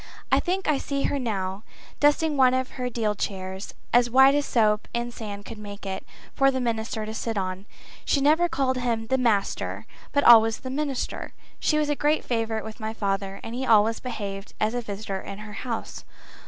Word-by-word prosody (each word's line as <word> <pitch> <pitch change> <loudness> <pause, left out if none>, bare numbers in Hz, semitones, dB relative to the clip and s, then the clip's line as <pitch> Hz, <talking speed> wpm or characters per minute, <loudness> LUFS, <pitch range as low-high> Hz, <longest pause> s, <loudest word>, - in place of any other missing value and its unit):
I - - +5
think 375 +2 -1
I 300 -3 +2
see 275 -1 -2
her 285 - 0
now, 195 -5 -2 0.4
dusting 295 +1 +3
one 255 -2 +5
of 260 0 -1
her 250 -1 -3
deal 225 -3 0
chairs, 190 -1 -5 0.2
as 240 0 +5
white 265 +3 +7
as 290 0 +1
soap 215 -2 +2
and 240 0 -2
sand 205 -3 -7
could 225 -2 -8
make 205 -1 -9
it, 190 -1 -4 0.3
for 275 -1 +4
the 260 -1 -1
minister 225 -2 -2
to 220 - -5
sit 225 0 -3
on. 190 +1 -3 0.4
She 285 - +2
never 315 +5 +4
called 270 -5 0
him 235 -3 -1
the 260 +4 +1
master, 220 -5 0 0.3
but 285 0 +2
always 225 -1 +7
the 260 - -5
minister. 280 -2 -3 0.3
She 305 - +2
was 305 -1 +1
a 295 - +1
great 295 +2 +1
favourite 225 -2 -1
with 220 +2 -8
my 220 0 -4
father, 195 -1 -2
and 225 - -6
he 255 +2 -3
always 225 -2 +4
behaved 200 -5 -6
as 215 +1 +1
a 245 - -1
visitor 200 -3 -5
in 195 - -7
her 210 0 -9
house. 230 +1 -5
230 Hz, 200 wpm, -25 LUFS, 210-265 Hz, 0.4 s, white